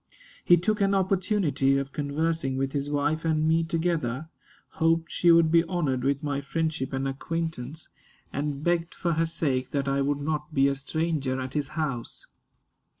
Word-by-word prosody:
He 175 - +6
took 210 +5 0
an 200 0 +3
opportunity 185 - +2
of 140 0 -3
conversing 145 -1 -1
with 135 0 -1
his 140 0 -2
wife 150 +2 0
and 155 -1 +1
me 165 +1 +3
together, 160 -4 -1 0.4
hoped 165 -1 +1
she 175 - +3
would 165 -1 +5
be 165 0 +5
honored 150 -8 -1
with 140 +2 0
my 145 -1 -1
friendship 155 -1 -2
and 135 0 -1
acquaintance, 155 0 -4 0.4
and 145 0 -3
begged 170 0 0
for 170 -2 0
her 165 +1 +1
sake 130 -6 -1
that 140 -1 -1
I 140 0 +1
would 145 +1 0
not 150 +1 -3
be 135 0 +5
a 140 - +2
stranger 140 -1 -2
at 130 0 -5
his 145 -2 -1
house. 135 -7 -3
155 Hz, 170 wpm, -27 LUFS, 140-165 Hz, 0.4 s, He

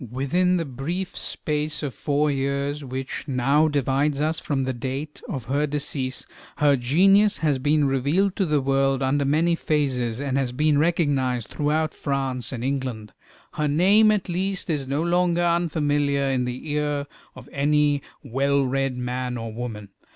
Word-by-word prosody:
Within 175 +9 +1
the 165 - -2
brief 155 +8 -4
space 150 0 -3
of 140 -4 -3
four 145 +5 0
years 140 +1 -2
which 130 +2 -5
now 140 +4 +3
divides 140 0 0
us 155 +2 0
from 135 -3 -1
the 130 0 -1
date 135 +5 -5
of 130 -5 -4
her 140 +4 0
decease, 140 -3 -3 0.3
her 145 -1 +4
genius 195 +11 +4
has 145 -4 +1
been 145 +2 +2
revealed 145 +9 +1
to 195 - +1
the 150 -2 +2
world 135 0 +1
under 140 +2 +1
many 160 +5 +2
phases, 130 -8 -1
and 140 -1 -1
has 130 -3 -1
been 150 +2 +2
recognized 140 -8 +1
throughout 155 +2 0
France 135 -4 -3
and 120 -3 -5
England. 130 -6 -3 0.4
Her 150 - -1
name, 195 +9 +5
at 210 -3 +1
least, 190 +1 -2
is 140 -4 -2
no 140 +4 0
longer 175 0 +2
unfamiliar 145 -5 +1
in 125 -1 0
the 125 +5 -5
ear 145 -1 -1 0.3
of - - -12
any 145 0 +2 0.2
well 140 +2 +1
read 135 0 -1
man 125 0 -3
or 115 -1 -6
woman. 110 -3 -6
140 Hz, 160 wpm, -24 LUFS, 130-155 Hz, 0.4 s, name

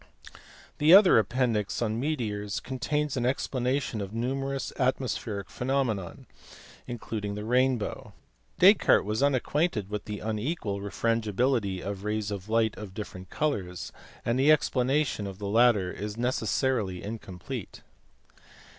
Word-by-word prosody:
The 155 +5 +8
other 195 - +8
appendix, 115 -2 0
on 110 -1 -1
meteors, 110 -8 -2
contains 145 +3 -2
an 125 - -1
explanation 130 -2 -1
of 100 +2 -6
numerous 135 +3 -2
atmospheric 125 -6 -1
phenomena, 125 -8 -1 0.7
including 110 -3 -4
the 105 +1 -5
rainbow; 125 -1 0 0.5
Descartes 190 - +6
was 105 +3 -1
unacquainted 140 - +1
with 105 -1 -4
the 105 0 -4
unequal 110 -1 -3
refrangibility 110 0 0
of 100 0 -5
rays 105 0 -2
of 100 0 -6
light 110 -1 +2
of 100 -3 -8
different 95 -4 -7
colours, 95 -13 -2 0.3
and 120 +2 +1
the 145 +3 +6
explanation 135 -5 +1
of 95 -1 -7
the 105 - -6
latter 105 -4 +4
is 105 +2 -6
necessarily 120 -5 0
incomplete. 100 -4 -7
115 Hz, 120 wpm, -28 LUFS, 105-130 Hz, 0.7 s, The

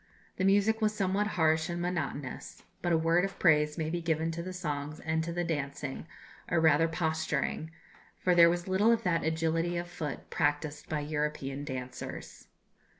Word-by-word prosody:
The - - -1
music 205 +3 +3
was 215 0 +2
somewhat 195 +1 +1
harsh 160 0 +3
and 175 0 -3
monotonous; 155 -6 -4 0.2
but 175 - 0
a 165 - +5
word 165 +2 +3
of 195 0 -3
praise 150 -3 +3
may 160 -1 -2
be 175 0 -2
given 165 0 0
to 165 +1 -4
the 185 +2 -5
songs 150 -4 -4
and 160 0 -1
to 170 - -4
the 175 +1 -1
dancing, 145 -2 -4 0.4
or 170 - +2
rather 160 0 +5
posturing, 160 -2 -1 0.5
for 180 - +2
there 170 -1 +8
was 175 +1 -1
little 195 +5 +4
of 230 -1 +2
that 165 -3 +1
agility 165 +2 0
of 175 0 -3
foot 160 -5 -6
practised 150 0 -1
by 155 -1 -1
European 145 -2 -3
dancers. 130 -3 -7
165 Hz, 175 wpm, -30 LUFS, 150-175 Hz, 0.5 s, there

